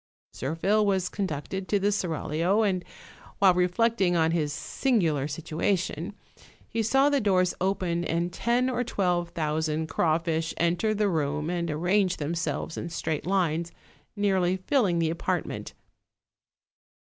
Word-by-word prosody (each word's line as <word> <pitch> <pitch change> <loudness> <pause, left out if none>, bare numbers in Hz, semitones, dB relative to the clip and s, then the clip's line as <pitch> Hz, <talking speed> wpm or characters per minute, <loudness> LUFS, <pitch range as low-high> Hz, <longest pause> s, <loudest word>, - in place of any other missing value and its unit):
Zirphil 175 +10 +1
was 190 -3 +1
conducted 190 0 -4
to 205 - +2
the 200 +1 +1
seraglio, 180 +2 0
and 185 -4 0 0.5
while 195 -2 +6
reflect 195 +6 +1
ing 175 -2 +3
on 160 -1 +3
his 155 -3 0
singular 160 - 0
situation, 170 +4 -2 0.5
he 230 - -1
saw 270 +6 +3
the 285 -2 +2
doors 185 -3 +2
open 180 -3 0
and 170 +1 -1
ten 240 +5 +1
or 245 -1 0
twelve 180 -6 0
thousand 155 -1 -1
crawfish 165 +1 0
enter 175 +6 +1
the 210 0 +2
room 150 -2 -1
and 170 -1 -2
ar 150 - -2
range 185 +2 +2
themselves 165 +2 -3
in 170 - -4
straight 160 -1 -3
lines, 170 -3 0 0.4
nearly 190 -3 +1
filling 190 -2 +1
the 165 -1 +1
apartment. 170 - -3
175 Hz, 135 wpm, -27 LUFS, 165-200 Hz, 0.5 s, while